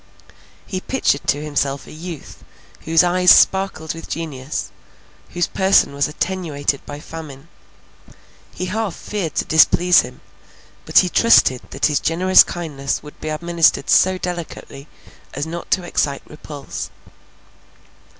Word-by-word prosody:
He 185 Hz, -2 st, -5 dB
pictured 225 Hz, -, -1 dB
to 145 Hz, +1 st, 0 dB
himself 140 Hz, -2 st, -2 dB
a -, -, -13 dB
youth, 165 Hz, -1 st, -9 dB, 0.4 s
whose 165 Hz, +2 st, +4 dB
eyes 180 Hz, +1 st, +2 dB
sparkled 190 Hz, -5 st, +4 dB
with 165 Hz, -, -10 dB
genius, 135 Hz, -10 st, -5 dB, 0.6 s
whose 175 Hz, 0 st, -1 dB
person 190 Hz, -6 st, +2 dB
was 140 Hz, 0 st, 0 dB
attenuated 150 Hz, -4 st, -3 dB
by 145 Hz, 0 st, -7 dB
famine. 155 Hz, -1 st, -10 dB, 1.0 s
He 185 Hz, -, -5 dB
half 210 Hz, 0 st, -3 dB
feared 195 Hz, -7 st, -5 dB
to -, -, -1 dB
displease 175 Hz, +3 st, +5 dB
him; -, -, -11 dB, 0.7 s
but -, -, +1 dB
he 185 Hz, -, +7 dB
trusted 170 Hz, -, +4 dB
that 135 Hz, -, -2 dB
his 150 Hz, -2 st, +2 dB
generous 185 Hz, +3 st, +5 dB
kindness 145 Hz, -6 st, -4 dB
would 150 Hz, -, -14 dB
be 155 Hz, -, -4 dB
administered 165 Hz, -2 st, +1 dB
so 185 Hz, 0 st, +4 dB
delicately, 170 Hz, -5 st, -7 dB, 0.5 s
as 140 Hz, +2 st, -3 dB
not 170 Hz, +1 st, -7 dB
to 185 Hz, -, +1 dB
excite 140 Hz, -5 st, -2 dB
repulse. 150 Hz, -2 st, -8 dB
160 Hz, 130 wpm, -19 LUFS, 145-180 Hz, 1.0 s, he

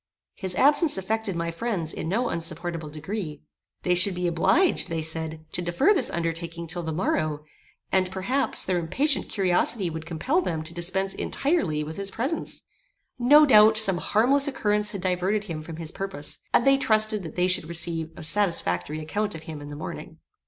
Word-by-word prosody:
His 190 Hz, -3 st, -2 dB
absence 295 Hz, -, +4 dB
affected 210 Hz, +1 st, -2 dB
my 170 Hz, 0 st, -2 dB
friends 175 Hz, -4 st, -2 dB
in 160 Hz, -, -5 dB
no 235 Hz, +6 st, 0 dB
insupportable 165 Hz, -1 st, -3 dB
degree. 155 Hz, 0 st, -6 dB, 0.4 s
They 180 Hz, -, +2 dB
should 180 Hz, +2 st, +4 dB
be 180 Hz, 0 st, -3 dB
obliged, 180 Hz, -, +2 dB
they 165 Hz, -1 st, -2 dB
said, 160 Hz, 0 st, -3 dB
to 180 Hz, -, -3 dB
defer 175 Hz, -, +2 dB
this 375 Hz, -, +2 dB
undertaking 170 Hz, 0 st, -4 dB
till 175 Hz, +2 st, -3 dB
the 160 Hz, -1 st, -4 dB
morrow; 155 Hz, -3 st, -1 dB, 0.5 s
and, 185 Hz, -1 st, +2 dB
perhaps, 220 Hz, +9 st, +1 dB
their 185 Hz, -1 st, 0 dB
impatient 270 Hz, -, 0 dB
curiosity 190 Hz, 0 st, +1 dB
would 160 Hz, 0 st, -7 dB
compel 255 Hz, -, 0 dB
them 160 Hz, -, -3 dB
to 160 Hz, +1 st, -9 dB
dispense 190 Hz, +3 st, -1 dB
entirely 230 Hz, -, -1 dB
with 155 Hz, +1 st, -7 dB
his 200 Hz, 0 st, -2 dB
presence. 270 Hz, +11 st, -2 dB, 0.6 s
No 295 Hz, +5 st, +7 dB
doubt, 215 Hz, -4 st, +6 dB
some 195 Hz, -5 st, +4 dB
harmless 270 Hz, +10 st, +3 dB
occurrence 210 Hz, -6 st, +1 dB
had 200 Hz, -3 st, -6 dB
diverted 185 Hz, +3 st, 0 dB
him 165 Hz, -7 st, -6 dB
from 160 Hz, +1 st, -8 dB
his 160 Hz, -1 st, -4 dB
purpose; 190 Hz, -7 st, -3 dB
and -, -, +3 dB
they 275 Hz, 0 st, +5 dB
trusted 215 Hz, -3 st, +2 dB
that 160 Hz, -4 st, -9 dB
they 180 Hz, 0 st, +2 dB
should 180 Hz, -3 st, 0 dB
receive 165 Hz, -1 st, +1 dB
a 160 Hz, -, -8 dB
satisfactory 155 Hz, -, -1 dB
account 205 Hz, +6 st, -2 dB
of 160 Hz, -, -9 dB
him 155 Hz, -2 st, -8 dB
in 145 Hz, -, -9 dB
the 145 Hz, -, -7 dB
morning. 155 Hz, -, -8 dB
180 Hz, 180 wpm, -25 LUFS, 160-215 Hz, 0.6 s, No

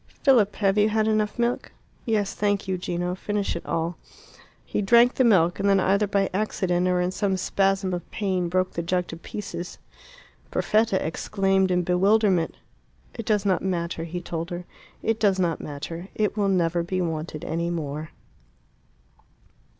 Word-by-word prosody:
"Philip, 230 Hz, -7 st, +4 dB
have 200 Hz, 0 st, +2 dB
you 210 Hz, +1 st, +4 dB
had 215 Hz, 0 st, +1 dB
enough 215 Hz, -1 st, +1 dB
milk?" 240 Hz, +1 st, -1 dB, 0.3 s
"Yes, 210 Hz, -3 st, +1 dB
thank 205 Hz, -1 st, 0 dB
you, 190 Hz, -, 0 dB
Gino; 175 Hz, 0 st, -2 dB
finish 205 Hz, +2 st, -2 dB
it 170 Hz, -, -5 dB
all." 165 Hz, +1 st, -1 dB, 0.7 s
He -, -, -2 dB
drank 235 Hz, +5 st, +5 dB
the 260 Hz, -, +2 dB
milk, 180 Hz, -7 st, +4 dB
and 200 Hz, -, +2 dB
then, 195 Hz, -1 st, +4 dB
either 200 Hz, +2 st, +2 dB
by 200 Hz, -1 st, +1 dB
accident 185 Hz, -3 st, 0 dB
or 180 Hz, 0 st, +2 dB
in 180 Hz, +1 st, 0 dB
some 195 Hz, 0 st, 0 dB
spasm 195 Hz, 0 st, +1 dB
of 175 Hz, -1 st, -5 dB
pain, 185 Hz, -4 st, -1 dB
broke 185 Hz, +1 st, 0 dB
the 170 Hz, -, -2 dB
jug 180 Hz, +1 st, 0 dB
to -, -, -6 dB
pieces. 180 Hz, 0 st, -7 dB, 0.7 s
Perfetta 215 Hz, -3 st, +1 dB
exclaimed 195 Hz, +3 st, +1 dB
in 180 Hz, -1 st, +2 dB
bewilderment. 190 Hz, 0 st, +2 dB, 0.6 s
"It 230 Hz, -2 st, -7 dB
does 210 Hz, -2 st, +2 dB
not 190 Hz, -2 st, +2 dB
matter," 170 Hz, -3 st, -2 dB
he 175 Hz, +2 st, -5 dB
told 170 Hz, 0 st, -4 dB
her. 175 Hz, 0 st, -5 dB, 0.4 s
"It 225 Hz, 0 st, 0 dB
does 200 Hz, -3 st, +3 dB
not 175 Hz, -3 st, 0 dB
matter. 150 Hz, +5 st, -6 dB
It 210 Hz, -1 st, 0 dB
will 205 Hz, -2 st, +1 dB
never 175 Hz, -2 st, +2 dB
be 185 Hz, +2 st, -2 dB
wanted 160 Hz, -3 st, -3 dB
any 170 Hz, +1 st, -1 dB
more." 155 Hz, -2 st, -4 dB
190 Hz, 165 wpm, -25 LUFS, 175-205 Hz, 0.7 s, drank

